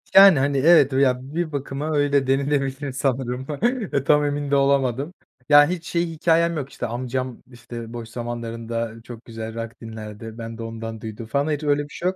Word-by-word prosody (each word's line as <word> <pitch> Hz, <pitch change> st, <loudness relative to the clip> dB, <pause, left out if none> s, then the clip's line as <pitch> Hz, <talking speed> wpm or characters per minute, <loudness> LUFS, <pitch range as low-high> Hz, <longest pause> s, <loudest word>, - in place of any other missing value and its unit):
Yani, 195 Hz, -7 st, +9 dB
hani, 140 Hz, 0 st, +1 dB
evet 145 Hz, -2 st, +6 dB
ya 130 Hz, -2 st, +3 dB, 0.2 s
bir 170 Hz, -2 st, -1 dB
bakıma 140 Hz, +2 st, -3 dB
öyle 140 Hz, -2 st, +2 dB
denilebilir 135 Hz, 0 st, 0 dB
sanırım, 130 Hz, -1 st, -2 dB, 0.6 s
tam 150 Hz, 0 st, +4 dB
emin 145 Hz, 0 st, -2 dB
de -, -, +4 dB
olamadım. 140 Hz, +2 st, +1 dB, 0.4 s
Ya, 145 Hz, 0 st, +8 dB
hiç 175 Hz, -2 st, -3 dB
şey 170 Hz, 0 st, 0 dB
hikâyem 165 Hz, +1 st, +2 dB
yok; 140 Hz, -1 st, -4 dB
işte 120 Hz, -, -5 dB
amcam 125 Hz, +1 st, -4 dB
işte 120 Hz, -1 st, -9 dB
boş 115 Hz, -1 st, -7 dB
zamanlarında 115 Hz, -1 st, -4 dB
çok 120 Hz, -1 st, -11 dB
güzel 110 Hz, -1 st, -7 dB
rock 115 Hz, +1 st, -6 dB
dinlerdi, 110 Hz, 0 st, -8 dB
ben 115 Hz, 0 st, -7 dB
de 115 Hz, -, -6 dB
ondan 115 Hz, -1 st, -6 dB
duydum 110 Hz, +1 st, -7 dB
falan. 140 Hz, +6 st, 0 dB
Hiç 150 Hz, +1 st, -2 dB
öyle 145 Hz, 0 st, +2 dB
bir 145 Hz, -, -12 dB
şey 175 Hz, -, -7 dB
yok. 190 Hz, -, -4 dB
135 Hz, 185 wpm, -23 LUFS, 115-145 Hz, 0.6 s, Yani